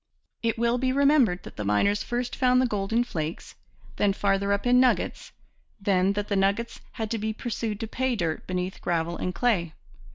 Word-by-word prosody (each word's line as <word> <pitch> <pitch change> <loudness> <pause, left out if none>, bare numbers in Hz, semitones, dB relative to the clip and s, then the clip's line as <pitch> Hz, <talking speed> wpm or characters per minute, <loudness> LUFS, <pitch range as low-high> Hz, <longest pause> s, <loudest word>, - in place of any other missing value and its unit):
It 230 -1 0
will 235 +1 +1
be 255 0 +1
remembered 270 -9 +3
that - - -11
the 105 - -3
miners 105 - +2
first 245 0 -3
found 255 -1 +3
the 255 - +3
gold 205 -4 -2
in 235 +2 +3
flakes, 160 -8 -5 0.4
then 200 -1 +2
farther 200 0 +1
up 200 +2 0
in 250 0 +5
nuggets, 255 -1 +1 0.5
then 195 -1 +2
that 205 0 -3
the 200 - -1
nuggets 200 +4 0
had 220 -2 -4
to 230 - -1
be 220 +1 -2
pursued 220 -2 -4
to 225 - -3
pay 260 +2 -1
dirt 165 -6 -2
beneath 180 +1 -3
gravel 170 0 -1
and 180 -1 -3
clay. 185 -10 +1
205 Hz, 195 wpm, -26 LUFS, 190-240 Hz, 0.5 s, in